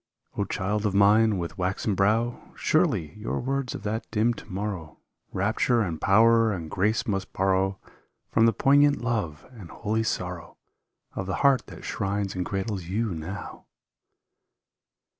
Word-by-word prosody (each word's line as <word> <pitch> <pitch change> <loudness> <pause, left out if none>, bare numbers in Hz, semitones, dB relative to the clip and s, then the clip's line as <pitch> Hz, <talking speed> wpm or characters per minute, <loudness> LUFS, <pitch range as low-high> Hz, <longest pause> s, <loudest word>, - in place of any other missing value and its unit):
O, 100 - 0
child 105 +2 -1
of 100 - -2
mine, 105 +1 +5
with 85 -2 -5
waxen 95 +3 -1
brow, 110 +5 0
Surely 75 -2 +1
your 105 - -2
words 135 0 -2
of - - -8
that 110 +2 -3
dim 115 +2 +2
to - - -12
morrow 95 -5 -4 0.3
Rapture 110 +4 +1
and 85 -7 -3
power 115 +3 +5
and 85 -5 -5
grace 105 +5 +1
must 95 -4 -2
borrow 95 0 +1 0.5
From 115 0 +4
the - - +5
poignant 145 +5 +4
love 105 -11 -2
and 105 -9 -11
holy 110 0 -1
sorrow 90 -5 -4 0.6
Of 95 - -4
the 95 - -1
heart 135 -2 +4
that - - -11
shrines 100 0 -2
and 90 - -2
cradles 95 -1 -3
you 105 +3 -1
now 85 +5 -7
105 Hz, 150 wpm, -26 LUFS, 95-115 Hz, 0.6 s, mine